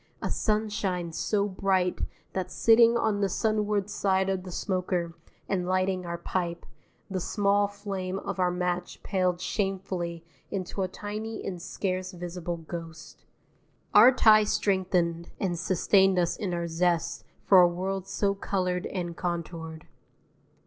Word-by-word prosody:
(A -, -, -3 dB
sunshine 210 Hz, -5 st, -1 dB
so 200 Hz, +5 st, 0 dB
bright 190 Hz, -2 st, 0 dB, 0.3 s
that 185 Hz, -1 st, -2 dB
sitting 230 Hz, +1 st, +5 dB
on 215 Hz, -3 st, +1 dB
the 200 Hz, -, +2 dB
sunward 210 Hz, -1 st, 0 dB
side 190 Hz, -2 st, +1 dB
of 190 Hz, -1 st, 0 dB
the 180 Hz, 0 st, -9 dB
smoker 180 Hz, -2 st, -1 dB, 0.3 s
and 180 Hz, -2 st, -1 dB
lighting 185 Hz, -1 st, 0 dB
our 170 Hz, 0 st, -3 dB
pipe, 170 Hz, 0 st, -3 dB, 0.4 s
the 190 Hz, -2 st, -3 dB
small 205 Hz, +2 st, +2 dB
flame 195 Hz, -2 st, -4 dB
of 195 Hz, -, -5 dB
our 180 Hz, -1 st, +3 dB
match 180 Hz, 0 st, -3 dB
paled 185 Hz, -3 st, 0 dB
shamefully 185 Hz, -3 st, -3 dB, 0.2 s
into 190 Hz, 0 st, -3 dB
a 190 Hz, -, +1 dB
tiny 215 Hz, +3 st, -6 dB
and 180 Hz, -3 st, -4 dB
scarce 185 Hz, 0 st, -3 dB
visible 175 Hz, -1 st, -5 dB
ghost.) 165 Hz, 0 st, -9 dB, 0.7 s
Our 225 Hz, +5 st, +9 dB
tie 215 Hz, -4 st, +6 dB
strengthened 180 Hz, -5 st, 0 dB
and 175 Hz, -3 st, -1 dB
sustained 190 Hz, +1 st, +3 dB
us 175 Hz, -1 st, +2 dB
in 195 Hz, -4 st, -3 dB
our 170 Hz, -1 st, -2 dB
zest 170 Hz, 0 st, 0 dB, 0.2 s
for 190 Hz, -2 st, +8 dB
a 175 Hz, -, +7 dB
world 190 Hz, +2 st, -3 dB
so 200 Hz, -1 st, 0 dB
coloured 185 Hz, -2 st, -1 dB
and 175 Hz, -3 st, -4 dB
contoured. 165 Hz, -2 st, -4 dB
185 Hz, 140 wpm, -28 LUFS, 175-200 Hz, 0.7 s, Our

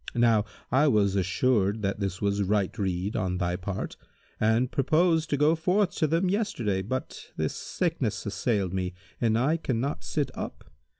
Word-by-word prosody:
Now 115 Hz, -3 st, +4 dB, 0.3 s
I 135 Hz, +5 st, +4 dB
was 100 Hz, -7 st, +3 dB
assured 100 Hz, +2 st, +1 dB
that 100 Hz, +1 st, -1 dB
this 95 Hz, -1 st, -3 dB
was 100 Hz, 0 st, +1 dB
right 100 Hz, -1 st, +1 dB
rede 95 Hz, 0 st, -1 dB
on 90 Hz, -1 st, -1 dB
thy 90 Hz, -1 st, 0 dB
part, 95 Hz, +1 st, -4 dB, 0.4 s
and 115 Hz, +3 st, +2 dB
purposed 160 Hz, +3 st, +2 dB
to 145 Hz, -, +1 dB
go 150 Hz, +3 st, +4 dB
forth 180 Hz, +4 st, +2 dB
to 155 Hz, -, +2 dB
them 165 Hz, +5 st, +1 dB
yesterday; 180 Hz, -, 0 dB
but 130 Hz, +7 st, -5 dB
this -, -, -1 dB
sickness 160 Hz, -, -2 dB
assailed 100 Hz, -2 st, -1 dB
me 90 Hz, -1 st, -2 dB, 0.3 s
and 115 Hz, -2 st, +3 dB
I 145 Hz, +7 st, +2 dB
cannot 135 Hz, -1 st, -2 dB
sit 145 Hz, -4 st, -1 dB
up. -, -, -7 dB
110 Hz, 165 wpm, -27 LUFS, 100-150 Hz, 0.4 s, Now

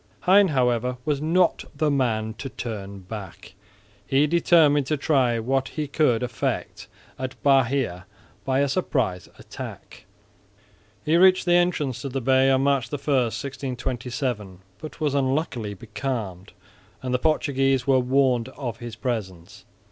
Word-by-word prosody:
Hein 195 Hz, +2 st, +5 dB
however 125 Hz, -4 st, 0 dB
was 145 Hz, -2 st, 0 dB
not 170 Hz, +3 st, +2 dB
the 150 Hz, +1 st, +1 dB
man 110 Hz, -5 st, 0 dB
to 135 Hz, -, -5 dB
turn 100 Hz, -6 st, -6 dB
back. 95 Hz, -1 st, -9 dB, 0.5 s
He 135 Hz, +2 st, +2 dB
determined 150 Hz, -3 st, +4 dB
to 155 Hz, -, 0 dB
try 135 Hz, -5 st, +2 dB
what 130 Hz, +3 st, 0 dB
he 150 Hz, +2 st, -4 dB
could 130 Hz, -5 st, +1 dB
effect 125 Hz, -2 st, -3 dB, 0.3 s
at 130 Hz, -2 st, -5 dB
Bahia 130 Hz, -9 st, +2 dB, 0.4 s
by 135 Hz, 0 st, +1 dB
a 140 Hz, -, +2 dB
surprise 130 Hz, -, -1 dB
attack. -, -, -10 dB, 1.0 s
He 160 Hz, +2 st, +3 dB
reached 185 Hz, +1 st, +5 dB
the 175 Hz, -, +3 dB
entrance 160 Hz, -8 st, +1 dB
to 140 Hz, -, -4 dB
the 135 Hz, +1 st, -2 dB
bay 130 Hz, +1 st, +3 dB
on 135 Hz, 0 st, +3 dB
March 140 Hz, -3 st, +1 dB
1, 145 Hz, -, -2 dB
1627, 125 Hz, -5 st, -2 dB, 0.2 s
but 155 Hz, -, -9 dB
was 150 Hz, -3 st, 0 dB
unluckily 130 Hz, -6 st, -1 dB
becalmed; 105 Hz, -3 st, -5 dB, 0.5 s
and 130 Hz, -1 st, -2 dB
the 125 Hz, -, +2 dB
Portuguese 135 Hz, -3 st, +1 dB
were 135 Hz, -2 st, +4 dB
warned 125 Hz, -2 st, +2 dB
of 120 Hz, -5 st, -6 dB
his 120 Hz, -1 st, -8 dB
presence. 105 Hz, -7 st, -5 dB
130 Hz, 140 wpm, -24 LUFS, 115-145 Hz, 1.0 s, Hein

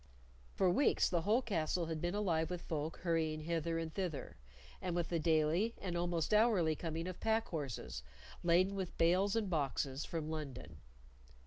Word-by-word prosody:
For 185 Hz, -2 st, +3 dB
weeks 275 Hz, +10 st, +3 dB
the 170 Hz, -2 st, +1 dB
whole 220 Hz, +8 st, +2 dB
castle 170 Hz, -4 st, 0 dB
had 160 Hz, -1 st, -3 dB
been 175 Hz, +3 st, -1 dB
alive 170 Hz, -6 st, +1 dB
with 180 Hz, -1 st, -4 dB
folk 155 Hz, 0 st, -3 dB
hurrying 160 Hz, -3 st, 0 dB
hither 165 Hz, +1 st, -1 dB
and 165 Hz, -1 st, -3 dB
thither; 175 Hz, -8 st, -3 dB, 0.5 s
and 180 Hz, -2 st, -2 dB
with 175 Hz, -1 st, -1 dB
the 170 Hz, -, 0 dB
daily 165 Hz, +7 st, +2 dB
and 180 Hz, -3 st, -3 dB
almost 175 Hz, +1 st, 0 dB
hourly 210 Hz, -8 st, +4 dB
coming 165 Hz, +1 st, -3 dB
of 185 Hz, -, -6 dB
pack 225 Hz, 0 st, +1 dB
horses, 140 Hz, -, -4 dB, 0.4 s
laden 180 Hz, +3 st, +3 dB
with 190 Hz, -3 st, -4 dB
bales 185 Hz, +5 st, +3 dB
and 225 Hz, -3 st, +1 dB
boxes, 140 Hz, -4 st, -1 dB
from 160 Hz, -2 st, -4 dB
London. 140 Hz, -, -6 dB
170 Hz, 165 wpm, -36 LUFS, 155-185 Hz, 0.5 s, hourly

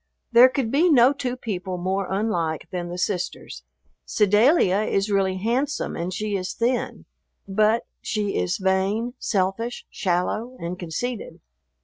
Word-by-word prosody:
There 240 Hz, +2 st, +8 dB
could 255 Hz, -4 st, -2 dB
be 325 Hz, +6 st, +4 dB
no 260 Hz, -2 st, +6 dB
two 255 Hz, -3 st, -3 dB
people 185 Hz, -6 st, -4 dB
more 190 Hz, +2 st, -2 dB
unlike 175 Hz, -6 st, -1 dB
than 175 Hz, -2 st, -4 dB
the 175 Hz, -, -5 dB
sisters. 180 Hz, -, -3 dB, 0.4 s
Sedalia 210 Hz, -, +3 dB
is 205 Hz, -1 st, 0 dB
really 190 Hz, -1 st, +1 dB
handsome, 250 Hz, +9 st, -1 dB
and 175 Hz, +2 st, -3 dB
she 210 Hz, +2 st, -2 dB
is 185 Hz, -1 st, -3 dB
thin. 245 Hz, +2 st, -1 dB, 0.4 s
But 215 Hz, +3 st, +2 dB, 0.2 s
she 210 Hz, -2 st, -2 dB
is 90 Hz, 0 st, 0 dB
vain, 195 Hz, +5 st, 0 dB
selfish, 200 Hz, +5 st, -1 dB
shallow, 210 Hz, +7 st, -1 dB
and 175 Hz, +2 st, -5 dB
conceited. 210 Hz, +8 st, -4 dB
205 Hz, 135 wpm, -24 LUFS, 185-235 Hz, 0.4 s, There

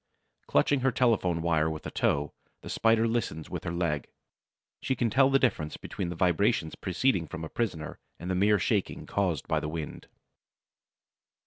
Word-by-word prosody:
Clutching 145 Hz, -, +3 dB
her 130 Hz, +1 st, +2 dB
telephone 100 Hz, -9 st, +2 dB
wire 80 Hz, -2 st, +2 dB
with 80 Hz, -1 st, -6 dB
a -, -, -4 dB
toe, 75 Hz, 0 st, 0 dB, 0.3 s
the -, -, -7 dB
Spider 115 Hz, 0 st, +3 dB
listens 105 Hz, -9 st, -2 dB
with -, -, -5 dB
her 85 Hz, -, -2 dB
leg; 85 Hz, -4 st, -1 dB, 0.7 s
she 130 Hz, -, 0 dB
can 120 Hz, -3 st, 0 dB
tell 135 Hz, +2 st, +5 dB
the 135 Hz, -, +5 dB
difference 80 Hz, -, 0 dB
between 95 Hz, -4 st, -5 dB
the 85 Hz, -, -4 dB
vibration 80 Hz, -2 st, +2 dB
proceeding 95 Hz, -2 st, +1 dB
from 80 Hz, +2 st, -7 dB
a -, -, -8 dB
prisoner 90 Hz, -10 st, -3 dB, 0.2 s
and 85 Hz, -, -8 dB
the 95 Hz, -, 0 dB
mere 100 Hz, +3 st, +4 dB
shaking 90 Hz, -, -1 dB
caused 90 Hz, -8 st, -1 dB
by -, -, +1 dB
the 75 Hz, -, -4 dB
wind. 80 Hz, -1 st, -6 dB
90 Hz, 175 wpm, -29 LUFS, 80-115 Hz, 0.7 s, tell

